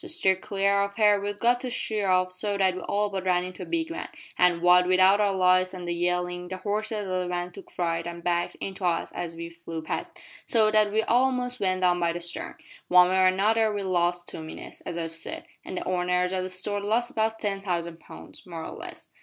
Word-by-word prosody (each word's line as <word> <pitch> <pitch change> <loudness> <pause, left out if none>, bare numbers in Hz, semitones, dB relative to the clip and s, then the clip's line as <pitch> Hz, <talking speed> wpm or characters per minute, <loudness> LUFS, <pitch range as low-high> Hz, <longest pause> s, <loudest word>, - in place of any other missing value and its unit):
To 360 - -7
steer 320 - +3
clear 200 +1 +1
of 200 0 -2
her 210 -2 +4
we'd 205 0 -3
got 240 +3 +3
to 255 - -4
sheer 215 -4 -1
off 185 0 +2
so 200 +2 -1
that 190 -1 +3
we 185 - -6
all 205 +2 -1
but 190 -1 -3
ran 180 -1 +2
into 185 0 -8
a - - -4
big 330 -1 -1
van, 330 - -5 0.3
and, 175 -1 +3
what 180 0 +6
wi' 185 0 +3
our 200 +2 +5
lights 185 0 +3
an' 180 -1 -7
the 175 - -1
yellin', 180 +1 -1
the 185 +1 -5
horses 210 +1 -2
o' 185 0 -1
the 180 - -2
van 175 0 -3
took - - -12
fright 165 -1 -2
and 170 0 -7
backed 175 0 0
into 195 0 -6
us 170 -2 0
as 170 -1 -5
we 170 0 -7
flew 165 -1 -7
past, - - -4 0.3
so 220 -3 +3
that 215 -1 +3
we 220 +1 +2
a'most 250 +1 +1
went 185 -1 0
down 180 -1 +3
by 170 -1 +1
the 175 - -4
starn. 175 0 -3 0.3
One 180 0 +6
way 190 0 +2
or 185 - +6
another 215 +4 +3
we 205 -1 -3
lost 175 -1 0
two - - -6
minutes, 160 - -9
as 170 - -4
I've 165 -1 -4
said, 165 - -5 0.2
an' - - -7
the - - -4
owners 180 0 +1
o' 185 - 0
that 185 - -4
store 200 +2 -2
lost 225 +4 0
about 220 0 0
ten 200 -3 -2
thousand 170 -3 -3
pounds 80 - -12
more 165 -2 -6
or - - -6
less.'" - - -9
185 Hz, 240 wpm, -26 LUFS, 175-205 Hz, 0.3 s, what